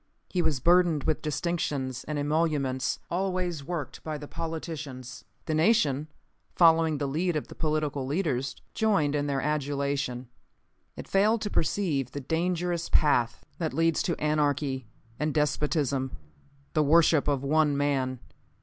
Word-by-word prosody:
He 180 - +1
was 160 -5 +1
burdened 170 -1 +4
with 155 - 0
distinctions 145 -5 -2
and 150 0 -3
emoluments, 145 -3 0
always 180 -4 -1
worked 160 -2 -5
by 155 -1 -3
the 145 0 -8
politicians, 150 -7 -6 0.2
for 160 - -1
their - - +1
benefit. - - +3
The - - +5
nation, 150 - +2 0.5
following 165 -2 +5
the 140 0 -1
lead 165 +5 0
of 150 - -3
the - - -8
political 150 -3 -1
leaders, 140 -4 -1 0.2
joined 200 -10 +2
in 145 0 0
their 140 -1 0
adulation. 140 -4 -1 0.7
It - - -8
failed 210 +3 +3
to 205 - -3
perceive 155 - 0
the 145 - -3
dangerous 170 +3 -1
path 125 -6 +2
that 160 -3 -2
leads 165 0 +2
to 170 - -1
anarchy 145 -4 0 0.3
and 150 0 -1
despotism 150 -3 0 0.6
the 155 - +3
worship 155 0 +4
of 140 -2 +1
one 150 0 +2
man. 135 -3 0
150 Hz, 150 wpm, -28 LUFS, 140-165 Hz, 0.7 s, The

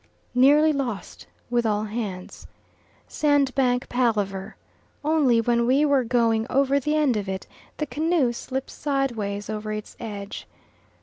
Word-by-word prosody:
Nearly 290 +5 +5
lost 240 -9 -4 0.2
with 240 -1 +2
all 210 -2 0
hands. 210 -4 -6 0.6
Sandbank 270 -4 +1
palaver 210 -5 -1 0.5
only 295 -7 +3
when 235 +1 +1
we 275 +4 +4
were 280 -3 +3
going 230 -2 +1
over 275 +1 +2
the 300 +3 -1
end 295 -6 +2
of 200 -2 -3
it, 190 0 -4 0.3
the 305 - -1
canoe 295 -2 +1
slips 265 +2 -5
sideways 235 -8 -2
over 215 0 -4
its 215 0 -6
edge. 205 -3 -7
245 Hz, 130 wpm, -24 LUFS, 215-275 Hz, 0.6 s, Nearly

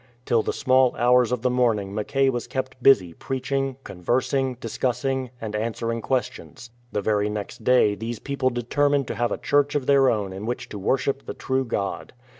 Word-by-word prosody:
Till 115 - +3
the - - -2
small 130 -2 +3
hours 125 0 +4
of 125 -1 -2
the 125 - +2
morn 125 -3 +3
ing 100 -1 -6
Mackay 135 +6 +1
was 120 -2 -4
kept 130 -1 -4
busy 95 -11 +5
preaching, 135 +3 -3
conversing, 130 +7 -1
discuss 125 +2 -3
ing, 130 -1 -1
and 110 -1 -5
answering 115 +1 -2
questions. 125 0 -3 0.2
The 105 - -2
very 105 0 +1
next 105 +1 -6
day 125 -4 +4
these 115 +3 -5
people 140 +1 -1
determined 140 +3 +1
to - - -3
have 120 0 0
a - - -1
church 145 +1 +1
of 140 -3 0
their 135 -1 +5
own 100 -4 -1
in 100 +3 -6
which 120 - -4
to 105 - -7
worship 135 +6 -1
the - - -5
true 130 0 -1
God. 100 -4 -3
125 Hz, 195 wpm, -24 LUFS, 110-135 Hz, 0.2 s, busy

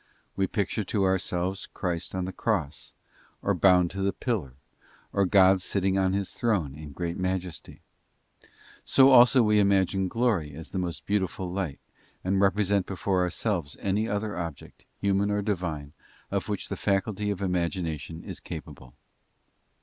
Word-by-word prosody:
We 95 -1 +1
picture 105 +1 -1
to 100 0 0
ourselves 95 0 0
Christ 90 -1 -4
on 95 -1 -1
the 95 - -5
cross, 90 - -2 0.5
or - - +2
bound 90 -2 +4
to 95 - -4
the 100 0 +2
pillar, 95 - -3 0.6
or 100 -1 +2
God 95 0 +5
sitting 95 0 0
on 95 -1 +2
His 100 -1 -1
Throne 100 - 0
in 75 0 -9
great 85 +3 -4
majesty. 95 -2 -4 1.0
So 135 0 +6
also 125 0 +7
we 105 -1 +4
imagine 95 -1 +2
glory 95 - 0
as 80 - -10
a 95 - -1
most 85 -4 -4
beautiful 95 -3 -1
light, 85 -8 -3 0.4
and 95 +1 +1
represent 100 -1 +2
before 95 -1 0
ourselves 90 -4 -1
any 100 +3 0
other 105 -1 -2
object, 85 -4 -7
human 100 0 +1
or 105 0 0
Divine, 85 -8 -3 0.4
of - - -2
which - - -3
the - - -3
faculty 100 +1 0
of 100 -3 -2
imagination 85 -4 -2
is - - -6
capable. 65 -1 -9
95 Hz, 150 wpm, -27 LUFS, 85-100 Hz, 1.0 s, also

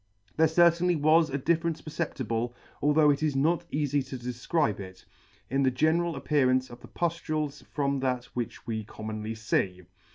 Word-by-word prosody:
There 160 - +5
certainly 170 +2 +4
was 155 +1 +4
a 140 - -1
difference 165 +3 0
perceptible, 120 -7 -3 0.3
although 150 0 +5
it 140 - -1
is 155 -3 0
not 165 +5 +1
eafy 145 -1 0
to 130 - -5
defcribe 125 - -1
it, 95 -1 -10 0.4
in 135 +2 0
the 135 - +4
general 160 +6 +1
appearance 130 -3 +1
of 120 0 -11
the - - -12
puflules 155 -4 -2
from 140 -1 -1
that 125 -2 -1
which 120 -1 -5
we 110 -2 -3
commonly 110 +1 -6
fee. 95 -4 -1
140 Hz, 160 wpm, -28 LUFS, 120-160 Hz, 0.4 s, There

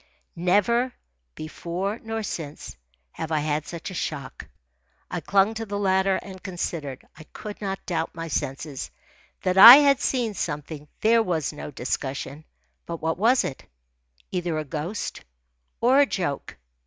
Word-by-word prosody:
Never, 210 +8 +2 0.4
before 175 +7 -4
nor 225 0 -4
since, 155 -7 -6 0.4
have 160 - -6
I 155 -1 +1
had 150 0 -1
such 170 +2 -6
a - - -7
shock. 140 -6 -5 0.6
I - - -2
clung 200 +2 +2
to 225 0 -4
the 205 0 -3
ladder 190 -1 +2
and 190 -1 -10
considered. 165 -7 -5
I 155 - -12
could 210 0 -8
not 195 -2 -4
doubt 165 -2 -2
my 165 0 -5
senses. 140 -1 -4 0.5
That 185 +1 +2
I 235 +5 +14
had 280 -2 +5
seen 240 -7 0
something 150 -3 -5
there 230 +1 +5
was 165 -8 -1
no 150 - -7
discussion. 135 +2 -4 0.4
But 170 -1 -5
what 160 +2 -2
was 240 +5 +4
it? 130 - -5 0.7
Either 175 -3 -1
a 155 - -3
ghost 160 +7 -4 0.6
or 255 +4 +5
a 285 - +5
joke. 145 - -3
175 Hz, 150 wpm, -25 LUFS, 155-205 Hz, 0.7 s, I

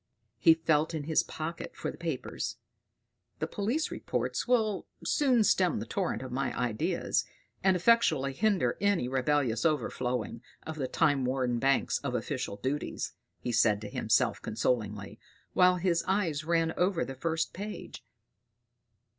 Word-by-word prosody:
He 165 - +7
felt 160 0 +1
in 155 - -3
his 155 +1 +3
pocket 165 +2 -6
for - - -3
the - - -13
papers. 155 -7 -3 0.8
"These - - -2
police 240 +11 -1
reports - - -2
will 220 -5 +1 0.2
soon 260 -7 +3
stem 185 -3 +3
the - - -4
torrent 185 -8 -2
of 130 - -7
my 135 +2 -2
ideas, 120 -3 0 0.4
and 190 -1 +4
effectually 170 - +3
hinder 185 - +1
any 200 -10 +2
rebellious 130 -3 +1
overflowing 125 -7 -1 0.2
of 160 0 -6
the 135 -3 -1
time 145 -4 +2
worn 125 -2 0
banks 135 +2 +2
of 140 -3 -3
official 125 -2 -3
duties"; 130 +8 -3 0.3
he 125 - -2
said 110 -3 +3
to 105 - -6
himself - - +1
consolingly, 105 -3 -2 0.3
while 180 0 +5
his 175 -2 +1
eye 190 -4 +1
ran 165 0 +1
over 180 -1 +1
the 135 - -6
first 160 +4 -2
page. 205 +3 -7
155 Hz, 145 wpm, -30 LUFS, 125-180 Hz, 0.8 s, He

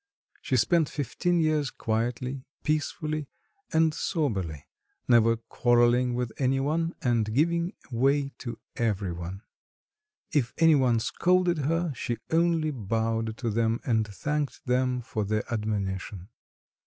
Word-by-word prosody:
She 130 - 0
spent 160 +5 +3
fifteen 170 +5 0
years 155 -3 +2
quietly, 120 +4 -2 0.2
peacefully, 155 -1 -1 0.4
and 160 -1 +3
soberly, 95 - -2 0.4
never 115 -1 +5
quarrelling 120 +1 +2
with 125 -2 -2
any 135 0 +2
one 165 +5 0
and 115 -4 +1
giving 170 - +1 0.2
way 135 +4 +2
to 120 -3 -6 0.2
every 105 -5 0
one. 85 +4 -6 0.9
If 130 -6 0
any 165 -1 +6
one 125 -5 +3
scolded 180 +7 +2
her, 165 +2 0
she 120 -1 -3
only 165 -1 +2
bowed 115 -1 -1
to 115 -3 -2
them 115 +1 +1
and 110 -3 +1
thanked 145 +7 -3
them 125 0 +1
for 110 -2 -3
the 105 +1 0
admonition. 100 -3 -3
125 Hz, 125 wpm, -27 LUFS, 110-155 Hz, 0.9 s, any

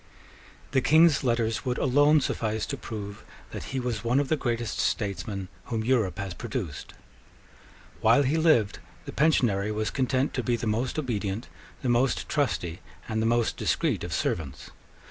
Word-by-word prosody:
The 130 0 +3
King's 155 +1 +5
letters 115 -5 0
would 125 -1 -1
alone 145 +3 +4
suffice 110 -3 -1
to 140 - -4
prove 105 -5 -7 0.3
that - - -6
he 135 - -3
was 120 -3 -3
one 120 +3 +2
of 140 - -1
the 155 - +3
greatest 120 -5 -2
statesmen 100 -2 -2 0.2
whom 110 -2 -2
Europe 115 -7 +1
has 100 -2 -4
produced. 105 - -5 1.0
While 115 +6 +5
he 140 +4 +1
lived, 155 -11 +3 0.3
the - - -6
Pensionary 115 -9 +2
was 110 0 -1
content 130 0 0
to - - -1
be 120 - 0
the 120 0 -4
most 115 +6 -1
obedient, 110 -6 -2 0.3
the 130 - 0
most 120 +1 +1
trusty, 90 - -1 0.3
and 110 0 -1
the 110 - +1
most 120 -1 +1
discreet - - 0
of - - -5
servants. 75 -5 -3
120 Hz, 165 wpm, -27 LUFS, 105-130 Hz, 1.0 s, King's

